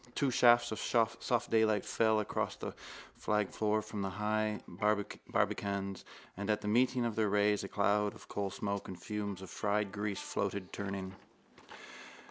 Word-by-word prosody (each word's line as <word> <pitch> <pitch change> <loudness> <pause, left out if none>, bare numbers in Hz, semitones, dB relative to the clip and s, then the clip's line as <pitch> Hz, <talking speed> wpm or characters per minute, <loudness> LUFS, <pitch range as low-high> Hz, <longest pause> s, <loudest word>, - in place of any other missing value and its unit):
Two 140 -3 +2
shafts 120 -1 +5
of 110 - -3
soft 115 +1 +1
daylight 110 -2 +3
fell 110 -1 +3
across 105 - -1
the - - -6 0.4
flagged 105 -2 0
floor 110 0 +1
from 105 -1 -5
the 95 - -1
high 105 +2 0
barbacans: 100 0 -1 0.3
and 100 +2 -4
at 105 0 +2
the 105 - -4
meeting 125 +3 +3
of 115 -2 -1
their 110 -2 +2
rays 105 0 +3
a - - -3
cloud 105 +1 +1
of - - -14
coalsmoke 100 0 -3
and 90 -2 -7
fumes 100 -3 -4
of 95 - -9
fried 105 -1 0
grease 105 -1 -2
floated, 100 -2 -3
turning. 95 -1 -4
105 Hz, 155 wpm, -34 LUFS, 100-110 Hz, 0.4 s, shafts